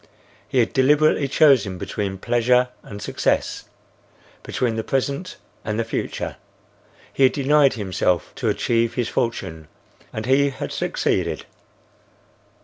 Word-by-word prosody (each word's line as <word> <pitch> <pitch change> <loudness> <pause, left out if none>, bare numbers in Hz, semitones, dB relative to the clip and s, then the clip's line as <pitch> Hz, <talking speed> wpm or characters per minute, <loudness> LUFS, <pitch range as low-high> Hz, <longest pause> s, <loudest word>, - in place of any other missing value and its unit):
He - - -3
had 115 -3 +2
deliberately 145 +2 +3
chosen 130 -10 +4
between 95 +1 -4
pleasure 125 +4 +2
and 100 - -9
success,—between 115 +2 -4
the 110 - -2
present 140 +7 -2 0.3
and 110 +1 -2
the - - +2
future. 110 - -4 0.8
He - - -4
had 130 - +6
denied 145 0 +4
himself 95 -4 -1
to - - 0
achieve 115 -1 0
his 120 -2 -1
fortune, 80 -9 -3 0.4
and 110 0 -5
he 140 +3 +3
had 135 - -6
succeeded. - - -1
120 Hz, 120 wpm, -22 LUFS, 110-135 Hz, 0.8 s, had